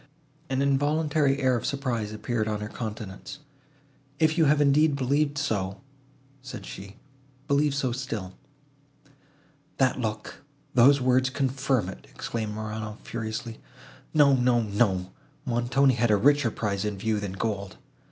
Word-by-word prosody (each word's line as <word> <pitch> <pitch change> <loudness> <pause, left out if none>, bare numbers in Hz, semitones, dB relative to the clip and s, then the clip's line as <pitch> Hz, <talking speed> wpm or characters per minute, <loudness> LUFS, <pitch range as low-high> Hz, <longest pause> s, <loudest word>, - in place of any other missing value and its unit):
An 135 +1 +1
involuntary 145 0 +2
air 130 -1 +3
of 120 - -2
surprise 120 -6 -2
appeared 110 +1 -2
on 105 -1 -1
her 105 0 -5
countenance. 110 +3 -7 0.8
"If 160 +1 +3
you 165 -2 +4
have 150 +1 +4
indeed 145 +1 +4
believed 140 +2 +1
so," 100 -10 -1 0.6
said 125 -6 -8
she, 100 +1 -9 0.5
"believe 140 0 +2
so 135 -3 0
still." 115 -7 -4 1.4
"That 130 -1 +2
look, 110 +3 -4 0.3
those 135 +3 +6
words 130 0 +3
confirm 135 -4 0
it," 95 - -9
exclaimed 110 -2 -4
Morano, 110 0 -5
furiously. 115 0 -5 0.5
"No, 145 -2 +5
no, 125 -2 +3
no, 100 -3 0 0.3
Montoni 130 +2 +2
had 120 -1 +1
a 105 - +5
richer 145 +3 +4
prize 100 -3 -2
in 105 -2 -2
view, 110 +1 0
than 100 -2 -4
gold. 100 -1 -3
120 Hz, 135 wpm, -27 LUFS, 105-140 Hz, 1.4 s, those